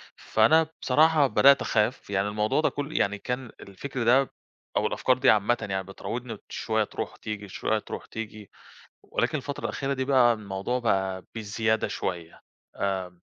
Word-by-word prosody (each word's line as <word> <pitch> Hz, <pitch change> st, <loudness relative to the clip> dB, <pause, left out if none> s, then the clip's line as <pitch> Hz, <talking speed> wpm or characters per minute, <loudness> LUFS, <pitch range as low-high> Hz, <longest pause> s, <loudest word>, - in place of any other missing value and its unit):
فأنا 155 Hz, +9 st, +3 dB
بصراحة 155 Hz, +2 st, +4 dB
بدأت 140 Hz, +1 st, +6 dB
أخاف 110 Hz, +1 st, 0 dB
يعني 100 Hz, 0 st, 0 dB
الموضوع 105 Hz, +7 st, +1 dB
ده -, -, +3 dB
كل 145 Hz, +1 st, -4 dB
يعني 105 Hz, +1 st, +1 dB
كان 125 Hz, +2 st, -4 dB
الفكر 120 Hz, +6 st, -5 dB
ده 130 Hz, +3 st, +4 dB, 0.5 s
أو -, -, +2 dB
الأفكار 130 Hz, -1 st, +1 dB
دي 115 Hz, -, +4 dB
عامةً 105 Hz, +4 st, +4 dB
يعني 95 Hz, 0 st, -1 dB
بتراوضني 115 Hz, +4 st, -6 dB
شوية 110 Hz, -1 st, 0 dB
تروح -, -, -5 dB
وتيجي 105 Hz, -2 st, -6 dB
شوية 110 Hz, +3 st, -1 dB
تروح -, -, -7 dB
تيجي، 110 Hz, -2 st, -8 dB, 0.5 s
ولكن -, -, -1 dB
الفترة -, -, -6 dB
الأخيرة 135 Hz, 0 st, -2 dB
دي 130 Hz, 0 st, -2 dB
بقى 130 Hz, -3 st, +5 dB
الموضوع 105 Hz, +3 st, -3 dB
بقى 95 Hz, -5 st, 0 dB
بزيادة 110 Hz, 0 st, 0 dB
شوية 85 Hz, -2 st, -4 dB, 0.4 s
آآ، 95 Hz, -3 st, -3 dB
110 Hz, 155 wpm, -27 LUFS, 100-130 Hz, 0.5 s, بدأت